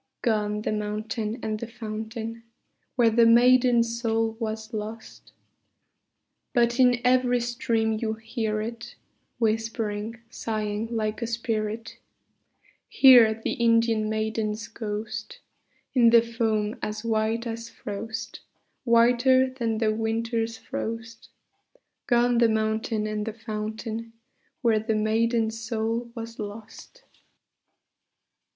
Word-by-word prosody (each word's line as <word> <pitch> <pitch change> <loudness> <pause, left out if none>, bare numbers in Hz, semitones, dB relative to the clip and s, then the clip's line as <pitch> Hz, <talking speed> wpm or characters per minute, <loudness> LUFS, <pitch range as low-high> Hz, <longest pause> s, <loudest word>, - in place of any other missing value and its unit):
Gone 210 -3 0
the - - -1
mountain 215 +1 -3
and 215 -1 -2
the 235 - -5
fountain 225 0 -6 0.5
Where 235 -3 +4
the 230 +1 +5
maiden's 240 -1 +4
soul 225 -1 0
was 220 0 -4
lost: 220 +1 -7 1.2
But 240 +1 +2
in 250 -1 +5
every 250 -1 +3
stream 235 -2 0
you 220 -1 -1
hear 220 -1 -3
it 230 +1 -7 0.4
Whispering, 225 -1 -1
sighing, 215 -1 -3
like 220 -1 -2
a 235 - -1
spirit, 225 -1 -3 0.9
Hear 235 -5 +7
the - - -1
Indian 230 -2 +2
maiden's 220 0 -2
ghost, 215 -1 -5 0.6
In 240 -3 +6
the 230 0 +7
foam 225 -2 -1
as 215 +1 -4
white 225 +1 0
as 230 0 -5
frost, 220 +2 -6 0.4
Whiter 245 +2 +4
than 230 -4 -2
the 215 -1 +1
winter's 225 +1 -1
frost: 230 0 -6 0.8
Gone 240 -1 +3
the 235 -1 +5
mountain 220 0 0
and 215 0 -2
the 225 0 -4
fountain 220 +1 -5 0.5
Where 225 -2 +4
the 220 +1 -1
maiden's 225 +1 +1
soul 230 +1 -2
was 230 0 -7
lost. 210 +1 -9
225 Hz, 110 wpm, -26 LUFS, 215-235 Hz, 1.2 s, Hear